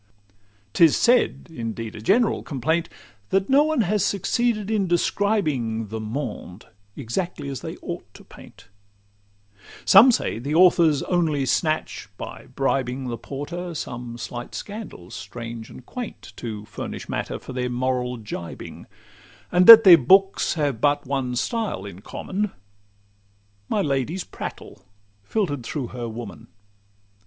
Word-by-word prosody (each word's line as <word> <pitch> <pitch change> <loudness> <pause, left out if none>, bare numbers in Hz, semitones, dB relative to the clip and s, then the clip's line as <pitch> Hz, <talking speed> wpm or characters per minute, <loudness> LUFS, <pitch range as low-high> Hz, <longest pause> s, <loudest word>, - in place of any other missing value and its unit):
'Tis 165 -3 +5
said—indeed 120 - 0
a 105 - -8
general 215 - +2
complaint— 160 +4 -1 0.4
That 195 +4 +1
no 275 +2 +6
one 310 -4 +2
has 210 0 +1
succeeded 215 +2 0
in 205 -3 +1
describing 155 - 0
The 110 +1 -4
monde, 110 -4 -6 0.3
exactly 140 +4 -4
as 135 -3 -5
they - - -6
ought - - -6
to - - -13
paint: - - -16 1.2
Some 225 +7 +8
say, 170 - -1
that 140 +5 -3
authors 170 -4 +5
only 160 -6 0
snatch, 155 - -1
by - - -8
bribing 130 -1 -1
The 120 - -4
porter, 170 +7 -6
some 120 -4 -6
slight 120 +2 -7
scandals 205 - -8
strange 115 +2 -7
and 125 - -13
quaint, 245 -4 -8
To 110 -3 -6
furnish 105 0 -7
matter - - -3
for - - -10
their 125 -1 -2
moral 125 0 -1
gibing; 105 -6 -8 0.6
And 180 +1 +4
that 225 -1 +13
their 180 -4 +9
books 195 +10 +4
have 145 -7 -1
but 145 0 +2
one 130 -2 -2
style 220 - -2
in 100 -1 -9
common— 200 - -3 1.2
My 205 - +1
lady's 145 +5 -1
prattle, - - -8 0.4
filter'd 145 - -2
through 125 +1 -4
her 120 -2 -5
woman. 110 -2 -8
140 Hz, 130 wpm, -23 LUFS, 120-190 Hz, 1.2 s, that